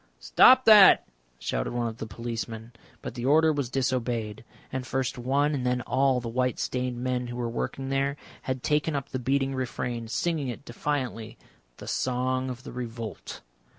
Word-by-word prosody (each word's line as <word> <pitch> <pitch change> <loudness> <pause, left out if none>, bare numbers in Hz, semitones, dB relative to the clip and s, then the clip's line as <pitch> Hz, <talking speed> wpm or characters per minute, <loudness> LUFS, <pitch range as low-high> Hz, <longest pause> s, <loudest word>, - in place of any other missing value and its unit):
"Stop - - +6
that!" 210 -3 +8 0.3
shouted - - -3
one 120 -1 -1
of 110 0 -6
the 110 - -6
policemen, 115 +1 -6 0.3
but - - -5
the 120 -1 -6
order 155 +3 +4
was 140 -4 -2
disobeyed, 120 -5 -2 0.3
and 130 -1 -2
first 130 0 -1
one 140 +4 +1
and 135 -3 -2
then 125 0 0
all 135 0 +2
the 120 - -6
white 125 +2 0
stained 125 -1 -2
men 125 0 -2
who 120 - -6
were 120 -1 -2
working 135 +3 -4
there 135 +1 0 0.2
had 130 -1 -4
taken 150 +1 +1
up 140 0 -3
the 130 - -3
beating 135 +2 0
refrain, 120 -2 -3
singing 150 +4 -1
it 125 +3 -6
defiantly 125 -6 -3 0.4
the - - -10
Song 130 +1 -1
of 125 -1 -7
the - - -8
Revolt. 115 -3 -7
125 Hz, 175 wpm, -27 LUFS, 120-135 Hz, 0.4 s, that